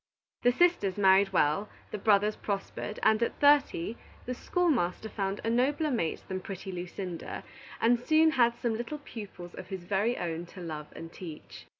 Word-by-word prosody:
The 245 - +5
sisters 250 - +2
married 195 0 +5
well, 170 +3 +2 0.2
the 210 - -4
brothers 210 +1 +3
prospered, 200 +1 -4
and 220 +1 +4
at 235 - -1
thirty, 285 - +3 0.3
the 250 - -2
schoolmaster 240 - 0
found 195 -1 -2
a 225 - 0
nobler 285 +6 +2
mate 170 -11 -1
than 190 -1 -3
pretty 190 0 -7
Lucinda, 180 -1 -5 0.4
and 235 +1 +4
soon 315 +5 +4
had 235 -4 +3
some 235 -1 -1
little 240 +6 -4
pupils 205 -10 -9
of 185 - -8
his 190 -3 -6
very 205 +6 +1
own 170 0 -3
to 185 - -12
love 155 -4 -6
and 165 0 -9
teach. 165 -5 -10
205 Hz, 170 wpm, -30 LUFS, 180-240 Hz, 0.4 s, The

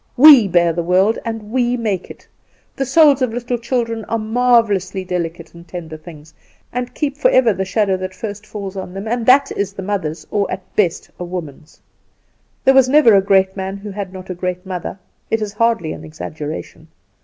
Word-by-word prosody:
We 270 -5 +9
bear 175 -2 +3
the 170 - -1
world, 185 +6 +2
and 225 -2 -6
we 245 0 +1
make 210 -6 -2
it. - - -13 0.5
The 270 - -2
souls 285 -1 +5
of 255 -3 +1
little 245 0 -2
children 235 -2 -2
are 230 - -1
marvellously 220 -5 +1
delicate 170 -2 -4
and 170 0 -14
tender 165 -3 -7
things, 155 -1 -13 0.4
and 250 0 -4
keep 290 -2 -2
forever 255 -6 +4
the 190 +1 -3
shadow 195 0 +1
that 185 0 -6
first 210 -2 -6
falls 200 -3 -6
on 190 -1 -7
them, 195 +3 -5
and 235 0 -2
that 275 +2 +5
is 200 -1 -2
the 195 - -7
mother's 165 -6 -3
or 200 -2 0
at 185 0 -7
best 180 -6 0
a - - -4
woman's. 165 -4 -8 0.9
There 270 - +6
was 265 -1 +5
never 280 -5 +6
a 195 - +6
great 190 -1 +2
man 190 0 -4
who 205 +1 -8
had 195 -1 -5
not 185 0 -8
a - - -2
great 180 +1 -4
mother 185 0 -5 0.3
it 225 - +1
is 210 -2 -4
hardly 225 -7 0
an - - -10
exaggeration. 155 0 -7
200 Hz, 195 wpm, -18 LUFS, 180-230 Hz, 0.9 s, We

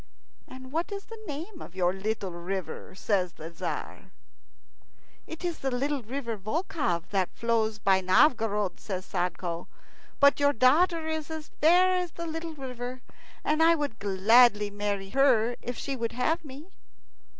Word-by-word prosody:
"And 260 0 -11
what 330 +6 -2
is 400 0 -5
the 450 -1 -11
name 330 +6 -6
of 175 - -10
your 180 -1 +2
little 200 0 -3
river?" 180 +2 -5
says 190 -3 0
the 160 +2 -9
Tzar. 165 - -5 1.2
"It 325 +2 -7
is 345 -2 -2
the 270 - -1
little 275 +2 -1
river 235 -1 -4
Volkhov 215 - -2
that 190 -3 +1
flows 225 -2 0
by 195 -2 +3
Novgorod," 210 0 +3
says 185 -2 -5
Sadko; 175 -1 -3 0.5
"but 280 0 +5
your 285 0 +4
daughter 315 +7 +3
is 315 -1 -3
as 315 -1 -6
fair 360 +4 +6
as 360 -2 -1
the 335 - -5
little 325 0 -5
river, 255 -2 -6 0.4
and 310 +1 +1
I 335 +1 +6
would 290 -8 -3
gladly 210 +2 +4
marry 205 -1 -3
her 245 -4 +3
if 245 0 -5
she 275 - -3
will 230 -2 -2
have 320 +8 0
me." 295 +5 -11
245 Hz, 155 wpm, -28 LUFS, 200-315 Hz, 1.2 s, fair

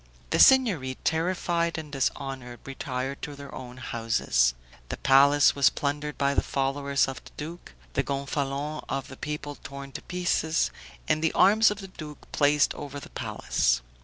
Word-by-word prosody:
The - - +2
Signory, 195 - +5
terrified 170 0 0
and 155 -2 -7
dishonored, 130 -2 -3
retired 135 0 -4
to 145 - -6
their 140 0 -10
own 125 -1 -8
houses; 115 - +1 0.3
the - - -4
palace 140 +1 +5
was 140 -2 +5
plundered 145 +1 -3
by 140 0 +2
the - - +2
followers 140 0 0
of 135 - -6
the - - -13
duke, 155 - -8 0.2
the - - +2
Gonfalon 140 +2 -3
of 135 - -3
the 135 - -10
people 150 -1 -5
torn 140 0 -8
to - - -7
pieces, 170 -3 0 0.4
and 155 - +1
the 160 - +2
arms 215 +3 +6
of 210 0 -4
the 195 - -8
duke 155 -5 -11
placed 145 0 +3
over 145 -1 -7
the - - -12
palace. - - 0
140 Hz, 160 wpm, -27 LUFS, 135-155 Hz, 0.4 s, arms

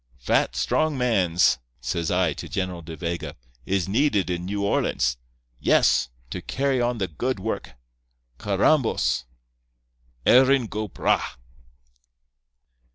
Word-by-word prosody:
"'Fat, - - +1
strong 155 -2 +1
mans,' 90 - +2 0.2
says 65 +7 -2
I 90 -3 +2
to - - -8
General 90 -2 -3
De 80 0 -8
Vega, 85 0 -4 0.3
'is 95 -2 0
needed 105 -4 +1
in 90 0 -3
New 100 +1 -2
Orleans. 65 -10 +1 0.4
Yes. - - +3 0.2
To - - -4
carry 135 -1 0
on 120 0 0
the 95 -3 -1
good 120 - -3
work. 110 +4 -4 0.7
Carrambos! 105 - +1 1.0
Erin 130 0 +5
go 110 0 -4
bragh! - - -1
95 Hz, 115 wpm, -24 LUFS, 85-125 Hz, 1.0 s, Erin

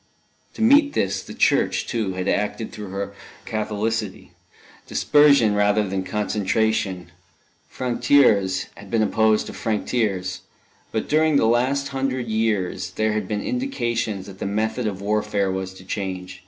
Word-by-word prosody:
To 220 - -2
meet 285 +5 +5
this, - - 0
the - - -10
Church, - - +2
too, 110 -5 -2
had 90 +1 -3
acted 105 +3 -1
through 105 -2 -8
her 100 +1 -4 0.3
Catholicity 110 -1 -3 0.6
dispersion 140 -7 +4
rather 105 0 +2
than 95 0 -2
concentration: 100 -2 -1 0.6
franc 125 -2 -3
tireurs 105 -9 +4
had 100 0 -13
been 110 0 +2
opposed 110 0 +2
to - - -8
franc 110 -3 -2
tireurs. 95 -6 -1 0.5
But 110 - -2
during 155 0 +3
the 140 - +4
last 130 +5 +1
hundred 135 -2 -2
years 105 -5 -1
there 110 0 +1
had 105 -3 -2
been 105 0 -2
indications 120 - -2
that 95 -1 -11
the - - -3
method 110 +3 -1
of 100 -2 -4
warfare 105 -1 0
was 95 0 -3
to 95 - -13
change. 95 -2 -5
105 Hz, 150 wpm, -23 LUFS, 100-120 Hz, 0.6 s, meet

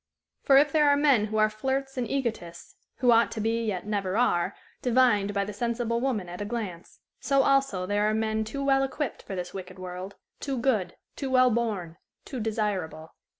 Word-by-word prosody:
For 270 - +5
if 290 +1 +5
there 300 -1 +4
are 285 - +4
men 280 -7 +4
who 215 0 -3
are 215 0 +5
flirts 265 +5 -3
and 245 -4 -2
egotists 225 -11 -4 0.2
who 245 -1 +3
ought 230 0 +4
to 220 - -5
be, 225 +2 0
yet 190 -3 -3
never 200 -2 -1
are, 200 -8 +1 0.3
divined 240 -5 +3
by 200 -1 -1
the 210 - -6
sensible 235 +1 -1
woman 235 -9 -1
at 175 +3 -7
a - - -1
glance 205 -6 -6 0.2
so 275 -1 +2
also 270 -10 +2
there 205 +2 +1
are - - 0
men 220 0 0
too 275 +6 -5
well 270 -1 +3
equipped 270 +1 -3
for 195 - -7
this 180 -1 -5
wicked 190 -1 -8
world, 185 +1 -7 0.2
too 275 -2 -3
good, 220 -8 0 0.2
too 275 - -4
well 255 -1 +5
born, 210 -8 -2 0.3
too 260 - -6
desirable. 205 -8 -3
220 Hz, 195 wpm, -27 LUFS, 200-260 Hz, 0.3 s, For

